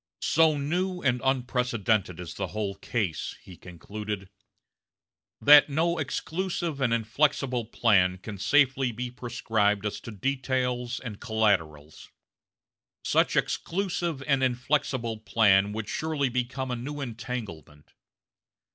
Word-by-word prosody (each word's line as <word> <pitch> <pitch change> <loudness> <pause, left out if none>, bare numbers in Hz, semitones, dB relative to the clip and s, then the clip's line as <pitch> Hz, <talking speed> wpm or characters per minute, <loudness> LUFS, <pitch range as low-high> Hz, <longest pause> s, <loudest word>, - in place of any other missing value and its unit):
"So 160 -1 +4
new 180 +6 -2
and 125 -2 +1
unprecedented 120 -8 0
is 90 -2 -7
the 95 - -3
whole 100 +2 -3
case," 95 -5 -3
he 90 - -13
concluded, 100 +3 -7 1.1
"that 145 +1 +8
no 165 +4 +1
exclusive 165 0 -3
and 125 -3 +2
inflexible 120 +1 +1
plan 95 -5 +3
can 100 +1 -8
safely 135 +2 +3
be 120 +2 -5
prescribed 110 -4 0
as 105 - -3
to - - -10
details 125 +1 -1
and 110 -5 -8
collaterals. 90 - -1 0.9
Such - - +2
exclusive 175 -6 -1
and 140 -2 +2
inflexible 130 -2 0
plan 105 -3 +3
would 110 0 -4
surely 155 -2 -1
become 125 +1 -2
a - - -1
new 145 +5 -6
entanglement. 110 - -7
120 Hz, 115 wpm, -27 LUFS, 105-140 Hz, 1.1 s, that